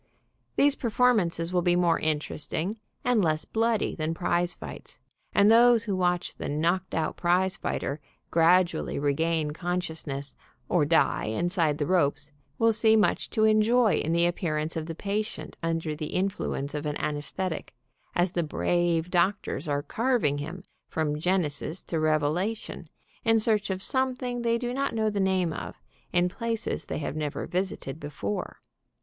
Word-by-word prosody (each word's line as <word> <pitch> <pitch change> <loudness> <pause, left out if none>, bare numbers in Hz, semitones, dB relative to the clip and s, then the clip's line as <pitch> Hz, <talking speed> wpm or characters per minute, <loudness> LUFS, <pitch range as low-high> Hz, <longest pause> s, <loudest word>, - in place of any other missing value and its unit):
These 285 0 +4
per 235 - -2
formances 195 -8 +2
will 180 - +3
be 175 0 +3
more 175 -1 +3
interesting 155 +6 -2 0.2
and 245 -3 +3
less 155 -1 +1
bloody 225 -1 +1
than 160 0 -2
prize 175 +1 0
fights, - - -9 0.3
and 205 +2 +5
those 235 0 +6
who 205 -4 -1
watch 180 -1 0
the - - -4
knocked 170 +5 0
out 160 - -1
prize 180 +2 +2
fighter 145 -5 -3 0.3
gradually 170 +2 +3
regain 150 +2 +1
consciousness, 160 -5 -3 0.3
or 170 -5 +2
die 160 +2 +2
inside 160 +5 +1
the 150 - -1
ropes, 150 -4 +1 0.3
will 230 0 +4
see 220 0 +4
mucfi 210 - +1
to 215 - +1
enjoy 220 +1 +4
in 160 - -1
the 170 +1 +3
ap 175 0 0
pearance 155 -2 -1
of 160 -1 -3
the 165 - -5
patient 210 +5 -3
under 165 -2 -1
the 155 0 -4
influence 185 -7 -1
of 150 0 -3
an 150 - -2
an 150 -1 -1
aesthetic, 160 +4 -4 0.4
as 175 0 +2
the 175 - 0
brave 170 +1 0
doctors 180 -4 0
are 145 -1 0
carving 230 - +1
him 165 +6 -6 0.3
from 150 -2 -1
Genesis 165 -1 -1
to 165 - -2
Revelation, 155 +8 0 0.4
in 225 -1 +4
search 215 -2 +1
of 190 0 -2
something 255 -2 -1
they 235 0 +2
do 245 0 -3
not 275 -1 -1
know 220 -1 +1
the 205 - -2
name 190 -3 +1
of, - - -7 0.3
in 175 0 +3
places 225 -5 -3
they - - -4
have 150 -1 -4
never 150 -2 -3
visited 175 -6 -3
before. 140 -9 -4
175 Hz, 160 wpm, -27 LUFS, 155-210 Hz, 0.4 s, those